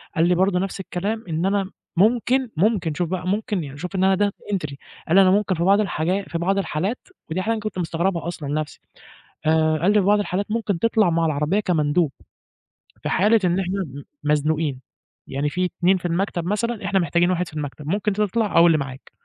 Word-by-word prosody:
قال 165 -1 +3
لي 180 - +3
برضه 185 0 +2
نفْس 195 +1 -3
الكلام، 205 +4 -3
إن 165 +2 -1
أنا 195 0 0 0.2
ممكن، 240 +6 +2
ممكن 180 -4 +1
شوف 175 +1 -2
بقى 180 0 -3
ممكن 205 -2 -1
يعني 140 -1 -8
شوف 180 +5 -6
إن 190 - +1
أنا 190 0 +4
Data 205 - -9
entry، 155 -7 -3 0.3
قال 165 - +2
لي 195 - +8
أنا 185 -1 +5
ممكن 200 -2 +2
في 170 - -1
بعض 195 +3 +4
الحاجا 190 -1 0
في 170 - -5
بعض 190 +4 0
الحالات، 195 +4 -2 0.2
ودي 170 +4 -1
حاجة 220 +4 0
أنا 220 - -3
كنت 215 -3 -5
مستغربها 170 +1 -1
أصلًا 155 -5 -5
نفْسي 155 +1 -3 0.7
آآ 155 0 +3
قال 180 +6 +3
لي 210 - +5
في 190 - +1
بعض 205 +1 +4
الحالات 200 0 -2
ممكن 215 -5 -1
تطلع 220 -3 +3
مع 165 0 +1
العربية 155 +5 +1
كمندوب، 160 -5 +1 0.9
في - - -2
حالة 215 +4 +4
إن 175 +1 +2
إحنا 195 +1 -1
م 140 -3 -9 0.2
مزنوقين، 150 -2 0 0.5
يعني 140 +2 -1
في 180 +4 -1
2 180 +1 +2
في 175 - -9
المكتب 175 0 -1
مثلًا، 215 +4 -2
إحنا 195 -1 +2
محتاجين 175 0 +2
واحد 180 0 -1
في - - -17
المكتب 150 -1 -6
ممكن 205 +3 0
تطلع 210 +1 0
أو 170 +1 +8
اللي 165 - +4
معاك. 135 -1 -7
180 Hz, 210 wpm, -22 LUFS, 160-200 Hz, 0.9 s, لي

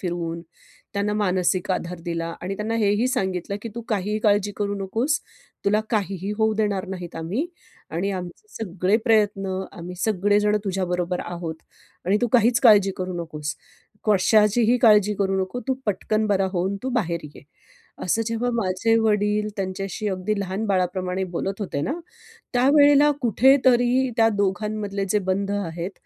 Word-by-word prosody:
फिरवून 170 -2 -3 0.5
त्यांना 200 +1 0
मानसिक 185 -2 0
आधार 180 -1 -3
दिला 165 -1 -2 0.2
आणि 190 +2 -3
त्यांना 215 +2 -2
हेही 210 +1 +2
सांगितलं 190 -4 -2
की 230 - -5
"तू 235 - -4
काहीही 210 0 -1
काळजी 205 -1 +2
करू 205 -1 -1
नकोस. 230 +10 0 0.5
तुला 210 +2 +3
काहीही 200 -3 -1
होऊ 220 0 +2
देणार 205 -3 -1
नाहीत 180 -3 -6
आम्ही 185 - -2 0.4
आणि 180 +5 -1
आमचे 180 - -7
सगळे 190 -1 0
प्रयत्न 200 -4 +1
आम्ही 175 +1 -8
सगळेजण 205 +1 +2
तुझ्याबरोबर 180 -2 -1
आहोत 170 -2 -5 0.5
आणि 190 +3 +3
तू 240 - +2
काहीच 235 -1 +4
काळजी 205 -5 +6
करू 185 0 -3
नकोस. 150 -2 -5 0.5
कशाचीही 215 +3 +4
काळजी 210 -3 +5
करू 195 -1 +1
नको. 215 +7 -5
तू 265 - +2
पटकन 215 +2 0
बरा 195 -2 +2
होऊन 190 +2 -1
तू 260 - -2
बाहेर 170 -4 -2 0.2
ये." - - -13 0.6
असं 220 +5 +1
जेव्हा 230 +2 -1
माझे 225 +1 +1
वडील 210 -1 +1
त्यांच्याशी 195 +2 -4
अगदी 195 +2 -2
लहान 195 +2 -3
बाळाप्रमाणे 185 -1 0
बोलत 195 +4 -3
होते 180 -8 -3
ना, 275 - -1 0.6
त्यावेळेला 285 +3 +5
कुठेतरी 255 +1 +4
त्या 225 -1 +5
दोघांमधले 205 0 -1
जे 210 - +2
बंध 195 +1 0
आहेत 180 -2 -3
200 Hz, 145 wpm, -23 LUFS, 185-220 Hz, 0.6 s, काळजी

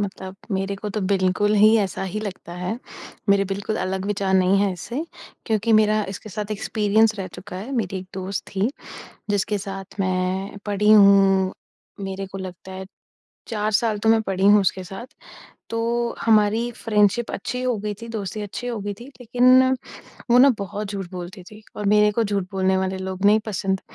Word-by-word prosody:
मतलब 190 -1 -5 0.2
मेरे 195 +1 -1
को 210 +1 -5
तो 215 - -3
बिल्कुल 195 +2 +1
ही 215 +2 +6
ऐसा 195 -2 -2
ही 195 +3 -3
लगता 185 -4 -7
है, 180 +6 -3 0.5
मेरे 200 0 +4
बिल्कुल 200 +3 -3
अलग 190 +1 -2
विचार 195 -2 0
नहीं 190 +1 +4
है 200 -2 +2
इससे, 240 - -5 0.4
क्योंकि 220 0 +1
मेरा 215 0 +4
इसके 200 +2 -7
साथ 210 +2 -5
एक्सपीरियंस 215 +1 +2
रह 190 - -3
चुका 180 0 -8
है। 225 +9 -6
मेरी 190 -4 -1
एक 185 - -9
दोस्त 190 +1 -4
थी 200 +6 +1 0.6
जिसके 205 +1 0
साथ 195 0 -7
मैं 185 +2 -1
पढ़ी 205 +1 +2
हूँ, 195 -2 +6 0.5
मेरे 195 0 -4
को 195 +1 -8
लगता 190 0 -8
है 190 0 -7 0.6
4 215 -1 -1
साल 215 0 +1
तो 220 - 0
मैं 225 0 +5
पढ़ी 195 -1 -2
हूँ 205 0 +7
उसके 190 0 0
साथ, 195 +7 -8 0.6
तो 235 +1 -1
हमारी 220 +2 +3
फ्रेंडशिप 210 +1 +2
अच्छी 250 +2 -4
हो 250 -3 0
गई 210 +1 -3
थी, 230 - -8
दोस्ती 215 -1 -4
अच्छी 205 +4 -6
हो 235 -2 -3
गई 205 +1 -3
थी, 235 +5 -12
लेकिन 250 +2 +5 0.7
वो 245 - +7
ना 275 +2 +8
बहुत 200 +2 -4
झूठ 195 -3 -5
बोलती 180 +1 -8
थी 210 +4 -14
और 210 - -4
मेरे 210 +1 +4
को 230 +2 +1
झूठ 200 -2 -1
बोलने 190 0 +1
वाले 190 0 -1
लोग 190 +1 -3
नहीं 210 +2 +6
पसंद। 190 -2 -1
200 Hz, 185 wpm, -23 LUFS, 190-215 Hz, 0.7 s, ना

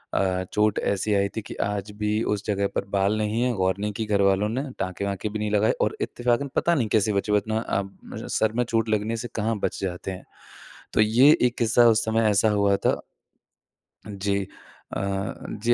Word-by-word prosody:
अ, 95 -1 +1
चोट 105 -1 +2
ऐसी 100 +2 0
आई 100 0 +2
थी - - -1
कि - - -8
आज 100 0 -3
भी 105 +1 0
उस 100 - -8
जगह 100 -1 0
पर - - -1
बाल 100 +2 +2
नहीं 110 +2 -1
है, 125 0 +1
गौर 95 -3 +1
नहीं 105 +1 -2
की 110 +2 -3
घरवालों 100 0 +2
ने, 130 +5 -2 0.2
टाँके-वाँके 100 +2 -3
भी 105 +1 -4
नहीं 105 0 -2
लगाए 105 +1 +3
और - - +1
इत्तेफ़ाकन 120 +3 0
पता 170 - +2
नहीं 125 -8 +1
कैसे 105 0 +2
बचे 100 +1 -1
वरना 110 +2 +1 0.2
अब 100 0 -8
सर 110 0 +2
में 120 +2 +1
चोट 115 -1 0
लगने 110 +1 0
से 120 - -5
कहाँ 110 0 0
बच - - -2
जाते 95 0 -4
हैं? 95 - -9 0.7
तो - - +4
ये 120 +7 +6
एक 125 -1 +2
किस्सा 120 +1 +4
उस 110 -1 +3
समय 110 0 +2
ऐसा 105 +1 +3
हुआ 100 -1 +3
था - - +2 1.1
अ, - - -9
जी। 100 0 -1 0.6
अ, 100 0 -2 0.3
जी 120 - +4
105 Hz, 200 wpm, -25 LUFS, 100-110 Hz, 1.1 s, ये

